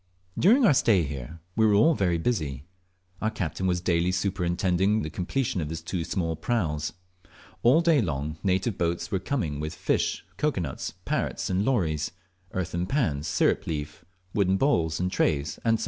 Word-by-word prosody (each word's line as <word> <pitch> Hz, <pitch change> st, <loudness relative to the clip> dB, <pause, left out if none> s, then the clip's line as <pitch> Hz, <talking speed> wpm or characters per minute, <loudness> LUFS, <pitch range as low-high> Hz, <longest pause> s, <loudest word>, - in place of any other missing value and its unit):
During 240 Hz, +8 st, +5 dB
our 175 Hz, -, +6 dB
stay 110 Hz, -8 st, +4 dB
here 70 Hz, +2 st, -6 dB
we 110 Hz, -, +3 dB
were 105 Hz, -2 st, +5 dB
all 155 Hz, +11 st, +5 dB
very 90 Hz, -, +1 dB
busy. 75 Hz, -, -1 dB, 0.6 s
Our 110 Hz, -, +1 dB
captain 95 Hz, -2 st, -3 dB
was 90 Hz, -1 st, +1 dB
daily 90 Hz, 0 st, +1 dB
superintending 95 Hz, +2 st, +1 dB
the 75 Hz, -, -5 dB
completion 95 Hz, -, -1 dB
of 75 Hz, -, -3 dB
his 80 Hz, 0 st, -5 dB
two 85 Hz, 0 st, -2 dB
small 85 Hz, -1 st, -2 dB
praus. 80 Hz, -6 st, -1 dB, 0.7 s
All 130 Hz, +8 st, +5 dB
day 165 Hz, -5 st, +4 dB
long 75 Hz, -3 st, -3 dB
native 95 Hz, +2 st, 0 dB
boats 85 Hz, +4 st, -1 dB
were 95 Hz, -, +1 dB
coming 90 Hz, -, -2 dB
with 75 Hz, +2 st, -4 dB
fish, -, -, 0 dB
cocoa 150 Hz, -11 st, 0 dB
nuts, 70 Hz, -6 st, -4 dB
parrots -, -, -1 dB
and 95 Hz, +2 st, +1 dB
lories, 85 Hz, -, +1 dB, 0.4 s
earthen 90 Hz, -1 st, -2 dB
pans, 85 Hz, -, 0 dB
sirip -, -, +1 dB
leaf, 75 Hz, -1 st, -4 dB, 0.3 s
wooden 95 Hz, -2 st, +2 dB
bowls, 85 Hz, -, +1 dB
and 90 Hz, +1 st, 0 dB
trays, 75 Hz, -5 st, 0 dB
&c. 115 Hz, -, +1 dB
&e. 115 Hz, -, +3 dB
90 Hz, 170 wpm, -27 LUFS, 80-110 Hz, 0.7 s, our